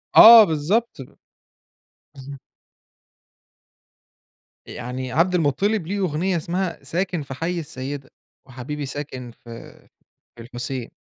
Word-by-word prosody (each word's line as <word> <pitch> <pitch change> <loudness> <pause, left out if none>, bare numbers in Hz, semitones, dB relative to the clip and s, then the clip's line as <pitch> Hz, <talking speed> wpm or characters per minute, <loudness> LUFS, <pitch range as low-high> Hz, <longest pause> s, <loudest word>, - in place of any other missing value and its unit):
آه 230 0 +11
بالضبط. 185 +9 -1 1.2
بالضب 140 0 -10 2.3
يعني 125 +1 -6
عبد 170 +7 +2
المطلب 170 +5 0
ليه 200 +2 -3
أغنية 180 0 -1
اسمها 175 0 -3
ساكن 175 +3 -2
في 135 -2 -8
حي 165 +6 -3
السيدة، 135 -2 -7 0.4
وحبيبي 135 +3 -6
ساكن 130 -3 -7
في 115 0 -12 0.6
في 120 - -12
الحسين. 120 +1 -5
145 Hz, 100 wpm, -22 LUFS, 130-180 Hz, 2.3 s, آه